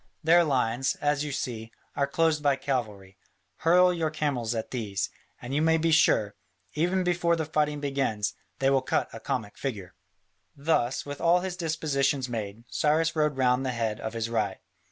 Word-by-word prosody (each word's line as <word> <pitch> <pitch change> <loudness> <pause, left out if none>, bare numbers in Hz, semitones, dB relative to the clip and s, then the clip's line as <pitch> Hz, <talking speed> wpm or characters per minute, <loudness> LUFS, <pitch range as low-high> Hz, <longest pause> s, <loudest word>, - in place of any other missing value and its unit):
Their 170 +2 +6
lines, 130 -4 0
as 145 0 0
you 150 - -4
see, 115 -5 -4 0.2
are 140 - +1
closed 160 +1 +1
by 140 -2 +3
cavalry; 105 -9 -4 0.4
hurl 180 +2 +4
your 165 -2 -1
camels 135 -7 -1
at 110 - -4
these, 100 -6 -2 0.3
and 120 +2 -7
you 145 - +2
may 160 0 +4
be 165 +1 +1
sure, 105 -9 +4 0.4
even 180 +4 +1
before 175 -1 +2
the 160 -1 -2
fighting 150 -1 0
begins, 135 -7 -1 0.2
they 135 0 +2
will 135 -1 +3
cut 130 - 0
a - - -7
comic 105 -2 -4
figure." 100 -10 -5 0.6
Thus, 140 -4 0
with 145 0 -7
all 175 +1 +4
his 185 -1 -4
dispositions 145 -5 0
made, 110 -2 -5
Cyrus 160 +5 +1
rode 150 -3 +1
round 125 0 +2
the 130 -1 -1
head 110 -2 -1
of 110 - -5
his 115 -1 -2
right. 115 -2 -1
140 Hz, 175 wpm, -27 LUFS, 115-160 Hz, 0.6 s, Their